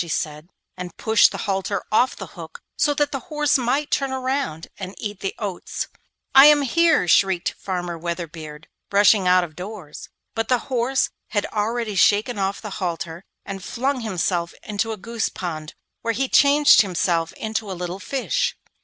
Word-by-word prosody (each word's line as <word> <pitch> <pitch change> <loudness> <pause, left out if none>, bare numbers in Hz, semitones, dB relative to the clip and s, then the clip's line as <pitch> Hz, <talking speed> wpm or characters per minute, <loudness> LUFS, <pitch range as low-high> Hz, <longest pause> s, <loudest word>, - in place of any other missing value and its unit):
she 175 - -5
said, 155 0 -3 0.3
and 180 -2 -8
pushed 220 0 +4
the - - -5
halter 195 -1 -1
off 245 +4 +3
the - - -7
hook - - -10 0.2
so 295 - +2
that 290 0 +1
the 275 - -2
horse 300 -3 +2
might 265 +5 0
turn 275 -1 +1
round 260 - -2
and 190 0 -6
eat 205 -2 -5
the 195 - -3
oats. 200 -4 -4 0.4
'I 270 +1 +10
am 300 -1 +6
here!' 320 - +3
shrieked 190 0 +3
Farmer 175 -3 -4
Weatherbeard, 160 -3 -6 0.2
rushing 200 -1 +5
out 180 0 +5
of 155 -3 -8
doors. 180 -4 -8 0.2
But 225 0 -1
the 250 - +3 0.2
horse 255 +2 +1 0.2
had 205 -2 -1
already 220 +1 -1
shaken 205 +4 +3
off 195 +2 -2
the 210 - -6
halter 170 -1 -3 0.2
and 195 -1 -6
flung 260 +5 -1
himself 180 -5 -1
into 210 +2 -2
a 220 - -4
goose 230 +3 -2
pond, 155 -4 -6 0.3
where 230 -1 -1
he 270 +3 0
changed 285 +2 +6
himself 175 -4 0
into 220 -1 -3
a 185 - -5
little 180 +1 -4
fish. 485 - -1
205 Hz, 170 wpm, -22 LUFS, 180-255 Hz, 0.4 s, I